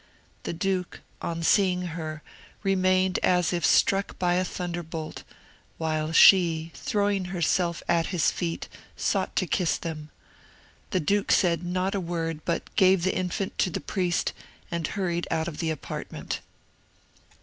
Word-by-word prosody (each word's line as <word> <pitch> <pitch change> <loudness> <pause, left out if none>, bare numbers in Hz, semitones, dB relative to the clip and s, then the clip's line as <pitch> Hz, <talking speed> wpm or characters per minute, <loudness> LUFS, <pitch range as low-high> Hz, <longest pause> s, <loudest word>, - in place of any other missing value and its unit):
The - - -4
duke, 185 +1 -2 0.2
on 165 0 -3
seeing 180 0 +3
her, 155 -2 -5 0.4
remained 185 -1 +2
as 180 -1 +2
if 170 -1 -1
struck 195 +4 +3
by 175 -1 +1
a 180 +1 +2
thunderbolt, 175 -3 -5 0.6
while 155 -1 -1
she, 165 -2 +6
throwing 200 -2 0
herself 175 -1 0
at 170 -1 +2
his 180 -5 +2
feet, 170 -2 -3 0.3
sought - - 0
to 185 - +2
kiss 175 -1 +1
them. 155 -2 -6 0.8
The 185 - 0
duke 200 +6 +1
said 170 -2 +3
not 185 +2 -1
a 200 - 0
word, 165 -3 -3
but 170 - -3
gave 190 -3 +5
the 190 - +1
infant 185 +2 -2
to - - +3
the - - -3
priest, 180 -3 -1 0.4
and 170 -3 -1
hurried 175 -3 -2
out 160 0 0
of 160 -3 -6
the 165 - 0
apartment. 155 -3 -5
175 Hz, 145 wpm, -26 LUFS, 165-185 Hz, 0.8 s, she